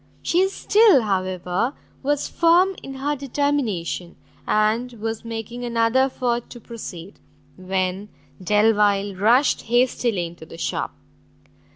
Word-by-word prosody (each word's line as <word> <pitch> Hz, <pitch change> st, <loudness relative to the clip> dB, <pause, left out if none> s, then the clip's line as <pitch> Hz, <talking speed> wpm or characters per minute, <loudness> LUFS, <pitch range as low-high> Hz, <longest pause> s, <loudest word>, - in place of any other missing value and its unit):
She 365 Hz, +3 st, +3 dB
still, 405 Hz, -, +4 dB
however, 185 Hz, +4 st, -1 dB, 0.3 s
was 290 Hz, +1 st, 0 dB
firm 350 Hz, +3 st, +3 dB
in 270 Hz, -, -8 dB
her 285 Hz, +2 st, -1 dB
determination, 260 Hz, -11 st, -2 dB, 0.3 s
and 220 Hz, +4 st, +1 dB
was 225 Hz, 0 st, -5 dB
making 230 Hz, +1 st, -6 dB
another 235 Hz, +1 st, +1 dB
effort 240 Hz, -3 st, -2 dB
to 240 Hz, -, -10 dB
proceed, 200 Hz, -6 st, -9 dB, 0.4 s
when 185 Hz, +2 st, -2 dB, 0.3 s
Delvile 205 Hz, 0 st, +3 dB
rushed 235 Hz, +9 st, +3 dB
hastily 240 Hz, -5 st, +1 dB
into 170 Hz, -1 st, -11 dB
the 165 Hz, -, -11 dB
shop. -, -, -3 dB
230 Hz, 110 wpm, -22 LUFS, 195-265 Hz, 0.4 s, still